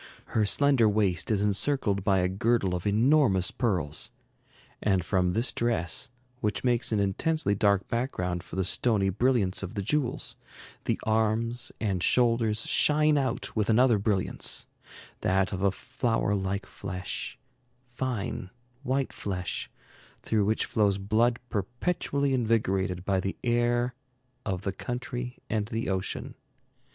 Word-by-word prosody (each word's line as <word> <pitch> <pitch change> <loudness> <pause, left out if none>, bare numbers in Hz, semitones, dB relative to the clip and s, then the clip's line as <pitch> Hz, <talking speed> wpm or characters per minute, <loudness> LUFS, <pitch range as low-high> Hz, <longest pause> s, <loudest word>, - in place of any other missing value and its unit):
Her 105 -2 +2
slender 135 -3 +4
waist 100 -4 +1
is 105 -2 +2
encircled 105 -1 +1
by 95 -1 +3
a 90 - +2
girdle 100 0 +1
of 90 +3 -2
enormous 110 -3 +4
pearls, 90 - -1 0.7
and 95 -4 +1
from 90 -2 +1
this 115 +5 +2
dress, 115 -8 0 0.3
which 105 -4 -1
makes 120 -2 +1
an 110 - +2
intensely 100 +5 +1
dark 100 -2 +2
background 90 -8 -2
for - - -10
the 95 - +1
stony 100 +1 +2
brilliance 105 -2 +1
of 95 +3 -6
the 100 - -2
jewels, 135 +3 -1 0.5
the - - 0
arms 110 +2 +1
and 95 -5 -1
shoulders 115 -1 +2
shine 150 0 +3
out 135 -4 -1
with 110 -1 0
another 115 -1 +4
brilliance, 100 -2 0 0.5
that 95 0 +1
of 95 - -3
a 100 0 +3
flower 120 -2 -1
like 100 0 -2
flesh, 90 -2 -5 0.6
fine, 120 -7 -3 0.3
white 135 0 -1
flesh, 90 -3 -4 0.5
through 105 -3 +1
which 110 +2 +1
flows 100 -3 +2
blood 110 +4 +2
perpetually 135 - -1
invigorated 95 -7 0
by 95 -1 +1
the 95 +1 -3
air 120 +1 +1 0.5
of 95 -2 -2
the 100 - -2
country 125 +2 -5
and 105 -2 -1
the 115 -2 -3
ocean. 95 -1 -3
105 Hz, 135 wpm, -28 LUFS, 95-120 Hz, 0.7 s, slender